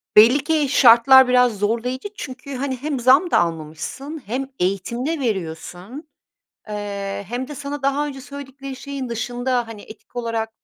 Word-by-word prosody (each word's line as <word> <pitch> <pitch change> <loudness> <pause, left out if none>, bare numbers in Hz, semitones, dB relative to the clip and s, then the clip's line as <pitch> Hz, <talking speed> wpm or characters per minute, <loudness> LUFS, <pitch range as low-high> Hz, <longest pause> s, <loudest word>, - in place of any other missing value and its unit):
belli 240 +6 +7
ki 305 -2 +1
şartlar 260 0 +7
biraz 250 -3 +3
zorlayıcı 235 - -1
çünkü, 265 -4 -7
hani, 260 0 -2
hem 280 +1 -3
zam 265 +9 +4
da - - +5
almamışsın, 170 - -4
hem 260 +6 -3
eğitim 195 +7 -1
de 325 +1 -1
veriyorsun, 195 - -5 0.6
eee, 200 -1 -4
hem 245 +2 -3
de 295 - -8
sana 285 +1 -5
daha 280 +2 +1
önce 270 -2 -7
söyledikleri 275 -1 -8
şeyin 270 -1 -6
dışında, 245 +1 -1
hani, 220 -2 -9
etik 220 +2 -15
olarak 230 -2 -2
250 Hz, 150 wpm, -21 LUFS, 220-275 Hz, 0.6 s, belli